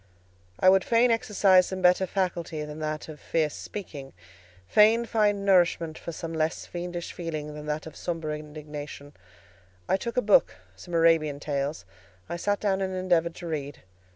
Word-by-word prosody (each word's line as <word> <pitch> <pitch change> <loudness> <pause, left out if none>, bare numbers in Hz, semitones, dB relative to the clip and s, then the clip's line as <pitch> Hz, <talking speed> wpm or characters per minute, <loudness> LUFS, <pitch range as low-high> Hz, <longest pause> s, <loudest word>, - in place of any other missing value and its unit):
I - - +3
would 190 0 +6
fain 235 +1 +3
exercise 200 -5 +4
some 190 -1 -5
better 180 +1 +4
faculty 170 -5 -2
than 150 +1 -8
that 155 0 -4
of 155 -2 -10
fierce 155 -3 0
speaking; 145 -9 -8 0.5
fain 220 - +5
find 205 -3 +1
nourishment 175 -4 +3
for 170 - -7
some 165 0 -6
less 160 +1 -1
fiendish 175 0 -5
feeling 155 -3 -5
than 150 0 -8
that 150 +1 -3
of 160 - -10
sombre 165 -3 -3
indignation. 150 -1 -9 0.7
I - - +2
took 235 +5 -5
a 250 - +3
book—some 95 - +1
Arabian 165 -3 +3
tales; 140 -5 -3 0.4
I 170 - -4
sat 205 +3 0
down 195 -2 0
and 190 -1 -2
endeavoured 175 -2 +1
to 175 - -8
read. 145 -3 -5
165 Hz, 160 wpm, -27 LUFS, 150-190 Hz, 0.7 s, would